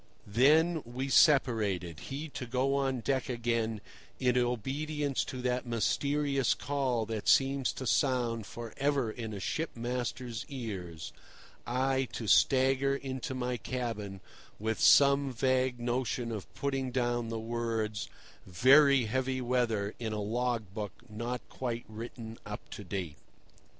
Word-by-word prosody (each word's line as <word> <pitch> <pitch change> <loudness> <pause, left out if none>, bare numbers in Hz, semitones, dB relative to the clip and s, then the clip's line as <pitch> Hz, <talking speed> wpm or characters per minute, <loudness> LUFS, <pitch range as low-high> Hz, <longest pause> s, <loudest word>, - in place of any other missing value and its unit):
Then 155 +9 +4
we 125 +3 -4
separated, 105 - +3
he 145 +4 -5
to 130 -3 -6
go 130 +3 +1
on 135 -3 0
deck 130 +3 -1
again, 115 -3 -1 0.4
in 125 -1 +2
obedience 135 +4 0
to 130 -2 -6
that 125 0 -1
mysterious 140 +4 +1
call 130 -5 -1
that 110 -1 -4
seems 135 -1 +4
to 130 - -6
sound 120 -4 +1
for 115 -1 -8
ever 140 -5 +1
in 110 -1 -6
a 100 - -5
shipmaster's 120 - -3
ears, 95 - -6 0.5
I 130 +2 +1
to 115 - -4
stagger 135 +5 +4
into 130 -1 -4
my 125 -1 -2
cabin 105 -5 -4 0.4
with 110 +1 -2
some 140 -1 +6
vague 130 0 +1
notion 120 -1 -1
of 105 -4 -6
putting 135 -2 -1
down 120 -2 0
the 115 - -3
words 115 -2 -2 0.4
"Very 135 - +6
heavy 130 +3 -1
weather" 120 -5 0
in 110 -2 -3
a 105 - -2
log 115 -1 -1
book 105 -2 -4 0.2
not 115 +3 -4
quite 120 -2 -4
written 115 +1 -8
up 105 0 -8
to 105 - -7
date. 90 -5 -4
125 Hz, 135 wpm, -31 LUFS, 110-135 Hz, 0.5 s, some